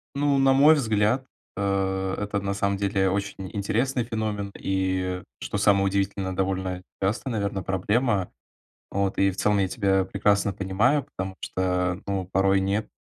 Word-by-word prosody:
Ну, 140 -1 +2
на 135 0 +5
мой 145 +4 +7
взгляд, 110 -1 +1 0.3
э, 95 -1 0
это, 105 0 -2
на 100 0 -2
самом 100 0 0
деле, 95 -1 +1
очень 100 +1 -2 0.2
интересный 115 +5 0
феномен 110 -3 -3
и, 95 -1 -1 0.2
что - - -4
самое 100 -1 +3
удивительное, 95 -1 -1
довольно 95 -1 -2 0.2
частая, 110 +6 -1
наверно, 100 -3 -2
проблема. 100 +2 0 0.6
Вот. 100 -1 -1
И 95 0 +3
в - - -10
целом 105 -1 +2
я 95 - +2
тебя 95 -3 +1
прекрасно 100 0 +1
понимаю, 110 +9 +1
потому 95 0 -6
что, 90 0 -1
ну, 95 -2 -1
порой 95 0 +3
нет- 100 +3 -1
100 Hz, 150 wpm, -25 LUFS, 95-105 Hz, 0.6 s, мой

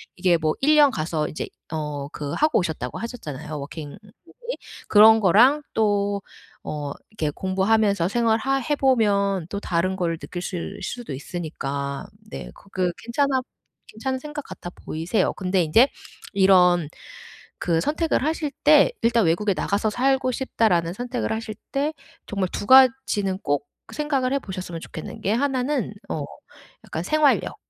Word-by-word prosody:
이게 180 -2 +3
뭐 155 -1 0
1 305 +2 +5
년 295 -2 +6
가서 155 -4 -2
이제 - - -5 0.2
어 150 -3 -4
그 145 -1 -5
하고 305 -4 +2
오셨다고 155 - -3
하셨잖아요 155 - -6
워킹 145 +1 -7
홀리데이 355 - -10 0.3
그런 220 +1 +8
거랑 240 - +5
또 205 -2 +1 0.4
어 145 -2 -4 0.2
이렇게 165 -8 -2
공부하면서 195 +2 +1
생활하 230 +4 +1
해보면 205 - +2
또 200 - -3
다른 185 0 -1
걸 175 -3 0
느끼실 175 -1 -5
수도 240 -8 -5
있으니까 140 -2 -4 0.2
네 65 -3 -7
그게 185 -2 -2
괜찮아 265 +2 +1 0.5
괜찮은 260 +5 -3
생각 295 +1 -7
같아 175 - -8
보이세요. 170 +4 -2
근데 185 0 0
인제 225 - +5 0.4
이런 180 -4 +5 0.7
그 165 -2 +1
선택을 310 - 0
하실 310 0 -1
때 305 +11 +6
일단 230 -2 +3
'외국에 190 +5 +2
나가서 205 +4 0
살고 260 +3 +1
싶다.'라는 185 -10 +1
선택을 245 +3 -3
하실 220 -1 -4 0.2
때 290 +3 0 0.3
정말 195 -3 -2
2 - - -4
가지는 255 -7 +5
꼭 145 -5 -1 0.2
생각을 275 -3 0
해보셨으면 185 -9 -5
좋겠는 160 - -8
게 200 - +1
하나는 260 -1 0 0.2
어 150 -3 -2 0.6
약간 160 - -4
생활력. 300 - +2
200 Hz, 295 characters per minute, -23 LUFS, 170-255 Hz, 0.7 s, 그런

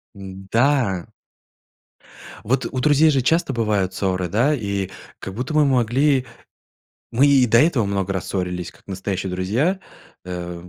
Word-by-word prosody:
М, 95 -1 -10
да. 115 -8 +2 1.4
Вот 130 +6 0
у 130 - -3
друзей 150 +3 +4
же 140 -3 +2
часто 160 +2 +1
бывают 105 -5 0
ссоры, 95 -2 -1
да? 120 - +2
И 100 -5 -3 0.3
как 95 - -7
будто 125 +8 -4
мы 155 -1 +4
могли 130 +1 +2 0.9
мы 130 +5 +3
и 135 -3 +5
до 115 0 +4
этого 145 -7 +2
много 100 -1 -2
раз 95 -3 -4
ссорились, 90 -2 -3
как - - -23
настоящие 95 -1 -4
друзья. 110 - 0 0.5
Э, 90 -1 -7
105 Hz, 145 wpm, -21 LUFS, 95-135 Hz, 1.4 s, и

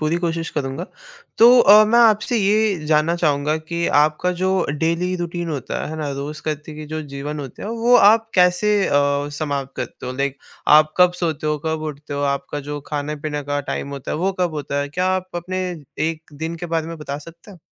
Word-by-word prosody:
पूरी 155 +2 +1
कोशिश 165 -1 -2
करूँगा। 140 +3 -3 0.5
तो 230 +2 +8
अ, 210 +1 +8
मैं 235 +3 +3
आपसे 225 +1 +4
ये 205 -4 +1
जानना 155 +2 +2
चाहूँगा 150 -2 +1
कि 170 +2 -3
आपका 155 +4 +1
जो 185 - +2 0.3
डेली 170 +3 0
रूटीन 175 0 -4
होता 140 -5 -4
है, - - -4
है 160 - -5
ना? 150 -2 -3
रोज़ 145 +2 -6
का 155 -1 -1
देखिए 150 0 -10
जो 155 +1 -4
जीवन 145 +1 -6
होते 135 -3 -9
हैं, - - -4
वो 230 +2 +2
आप 225 +1 +5
कैसे 180 +3 +3
अ, - - -2 0.5
समाप्त 140 -3 -3
करते - - -6
हो? 125 - -3
लाइक 140 +1 -2 0.4
आप 155 0 +1
कब 180 0 +6
सोते 160 -3 -2
हो, 150 0 0
कब 160 0 -1
उठते 145 +1 -9
हो? 140 - -2
आपका 140 +1 -2
जो 145 0 -4
खाने-पीने 150 0 -3
का 145 0 -1
टाइम 140 - -3
होता 140 -2 -6
है, - - -1
वो 190 +4 0
कब 175 -3 0
होता 145 -1 -2
है? 145 - -3
क्या 180 +5 -1
आप 185 0 -5
अपने 185 +2 -3 0.5
1 160 -1 -9
दिन 160 +3 -5
के 175 +1 -6
बारे 160 0 -1
में 165 - -6
बता 145 -2 -5
सकते 165 +6 -14
हो? 185 - -13
155 Hz, 215 wpm, -21 LUFS, 145-180 Hz, 0.5 s, तो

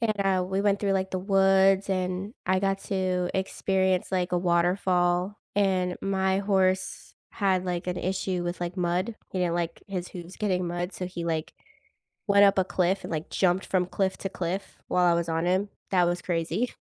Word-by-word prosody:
and, 230 -2 +2
uh, 190 -2 +2
we 190 +2 -1
went 200 -1 +2
through, 200 -1 +1
like, 190 0 0
the 185 - -2
woods 195 0 +4
and 185 +4 -2
I 190 - +3
got 195 0 0
to 185 -2 -1
experience, 190 -1 0
like, 180 -1 -1
a 180 - +3
waterfall 175 +2 +1 0.2
and 185 -3 +1
my 190 -1 +1
horse 190 -2 0 0.2
had, 190 -3 +1
like, 180 -1 -3
an 180 0 -2
issue 185 -1 -2
with, 175 +1 -4
like, 175 +2 -3
mud, 180 +5 0 0.2
you 185 - -1
know, 170 - -1
like 170 -1 -3
his 185 -3 -4
hooves 175 0 -9
getting 185 -4 0
mud, 175 +2 -3
so 180 - -4
he, 175 -2 -6
like, 160 -2 -2 0.8
went 200 0 +6
up 195 - +4
a 190 - +4
cliff 185 +1 0
and - - -6
like 160 0 -3
jumped 185 0 +1
from 180 -2 +1
cliff 190 +1 -1
to 195 - -5
cliff 185 +2 -4
while 180 0 +2
I 175 - +5
was 170 -1 -1
on 165 +1 -1
him. 190 +3 +1 0.2
That 180 -2 +3
was 175 0 -1
crazy. 175 +7 -1
185 Hz, 195 wpm, -27 LUFS, 175-195 Hz, 0.8 s, went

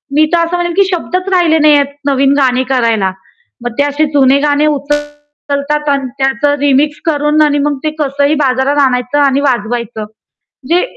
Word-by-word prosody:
मी 310 +1 +4
तर 335 -1 +3
असं 340 +1 -3
म्हणेन, 350 -1 -2
की 395 +3 +3
शब्दच 365 +2 -2
राहिले 345 -4 +3
नाहीयेत 295 -2 +4 0.2
नवीन 275 0 +2
गाणी 260 -2 +2
करायला. 225 -6 +1 0.5
मग 240 - -3
ते - - +4
असे 290 +2 0
जुने 275 -1 +4
गाणे 290 +1 +1
उचलतात 295 0 -3
अन् 275 -2 0
त्याच 270 -1 -1
रिमिक्स 290 +1 +1
करून 300 -1 +1
आणि 295 -1 +2
मग 290 0 -1
ते 310 - -1
कसंही 285 +1 0
बाजारात 265 +2 0
आणायचं 250 +2 -1
आणि 280 -1 +2
वाजवायचं. 235 -4 -2 0.4
म्हणजे 335 +7 -2
285 Hz, 165 wpm, -12 LUFS, 270-300 Hz, 0.5 s, मी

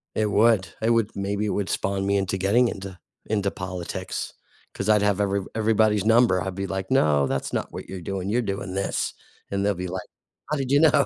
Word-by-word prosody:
It 105 -1 +1
would, 105 -5 +4
it 115 +1 +2
would 115 -2 +2
maybe 100 +2 -1
it - - -1
would 100 -1 -1
spawn 95 0 -1
me 100 - +2
into 95 -1 0
getting 115 +6 +3
into 95 -1 -7 0.3
into 100 -2 0
politics, 90 -2 -5 0.4
'cause 95 - -4
I'd 105 -1 +5
have 105 -1 +2
every 100 -1 +1
everybody's 110 -2 +2
number, 115 -5 +4
I'd 90 +2 -4
be 95 0 -3
like, 95 0 -4
"No, 75 - +3
that's - - -2
not - - -3
what - - -7
you're 95 - -5
doing, 95 +2 -3
you're 120 +4 +2
doing 100 -3 -4
this." 100 - -1 0.4
And 100 0 0
they'll 105 - +3
be 90 +1 -4
like, 95 +1 -5 0.4
"How 150 - +1
did 135 -2 -2
you 140 - +5
know?" 150 -2 +5
100 Hz, 215 wpm, -25 LUFS, 95-110 Hz, 0.4 s, I'd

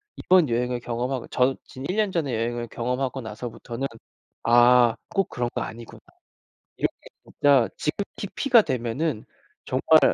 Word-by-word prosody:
이번 180 -7 +3
여행을 125 +1 0
경험하고 120 +2 -3
저 130 +1 +2
진 130 - -10
1 185 - -2
년 210 -2 +1
전에 155 -8 -1
여행을 120 +1 -2
경험하고 125 +3 -2
나서부터는 115 +3 -5 0.6
'아 120 0 +6
꼭 195 -2 0
그런 120 -1 -2
거 - - -2
아니구나. 115 +1 -8 0.8
이렇게 - - 0 0.3
진짜 140 -5 +3
지극히 200 +5 -4
P가 250 -5 +5
되면은 125 - -2 0.4
정말 - - +4
125 Hz, 295 characters per minute, -25 LUFS, 120-145 Hz, 0.8 s, 아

